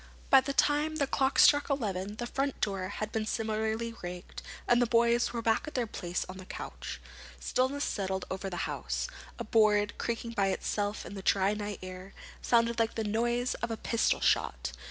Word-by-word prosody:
By 270 -1 +9
the 275 - -3
time 295 +2 +2
the 290 -3 +2
clock 270 0 +1
struck 290 0 +6
eleven 205 -7 -2
the 240 - -4
front 275 +3 -2
door 195 -2 -1
had 215 +1 -4
been 220 -1 -2
similarly 220 +1 -1
rigged, 180 0 -7 0.3
and 240 0 +5
the 245 - +3
boys 235 +1 +3
were 235 -1 -3
back 225 +6 +1
in 305 - -7
their 245 -2 +1
place 180 -4 -3
on 185 - -8
the 185 - -9
couch. - - -6 0.4
Stillness 270 +3 0
settled 190 -2 -2
over 190 +1 -3
the 175 -2 -2
house. - - -3 0.3
A 235 - -3
board, 215 -1 +3
creaking 235 0 -2
by 200 -4 +1
itself 205 +2 -1
in - - -8
the 195 - -6
dry 195 +1 +3
night 205 -2 -4
air, 185 +1 -9 0.3
sounded 235 -1 +2
like 225 0 +1
the 225 - -1
noise 240 +3 0
of 235 - -1
a 225 - -3
pistol 230 0 +1
shot. - - +1
220 Hz, 195 wpm, -30 LUFS, 195-240 Hz, 0.4 s, By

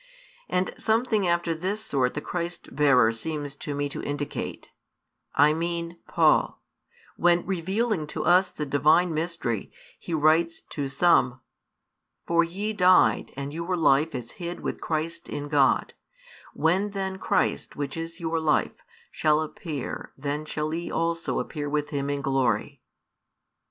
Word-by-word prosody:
And 180 0 0
something 220 -3 +1
after 170 -1 +1
this 195 +7 -3
sort 130 -9 0
the 150 - -2
Christ 170 -4 -5
bearer 130 -6 +5
seems 145 +4 -4
to 145 0 -5
me 145 0 -1
to - - -5
indicate 145 0 -5 0.6
I 150 +2 +5
mean, 170 +1 -3
Paul - - +3 0.6
when, 175 0 +3
revealing 190 0 -1
to - - -4
us 180 +3 +5
the 150 - -5
Divine 155 +5 +3
Mystery, 155 - -2 0.3
he 170 - -3
writes 160 +2 +3
to 140 -2 -3
some: 135 -4 +3 0.8
For 170 0 +3
ye 200 +6 -3
died 185 -2 +4
and 140 +1 -4
your 170 +3 -2
life 155 -1 +3
is 120 -2 -6
hid 175 0 -5
with - - -4
Christ 165 +1 -3
in 145 0 -4
God; 140 -3 +3 0.6
when 185 +6 +2
then 190 -1 -3
Christ, - - 0
which 145 -2 -3
is 165 0 -6
your 165 -1 -1
life, 155 -2 +1 0.3
shall 150 -1 +2
appear, 155 -2 -5
then 145 +2 -3
shall 155 0 -3
ye 170 +1 -3
also 165 0 -1
appear 145 -2 -3
with 150 0 -1
Him 140 -1 -2
in 140 -1 -2
glory. 135 -3 0
160 Hz, 145 wpm, -26 LUFS, 145-175 Hz, 0.8 s, bearer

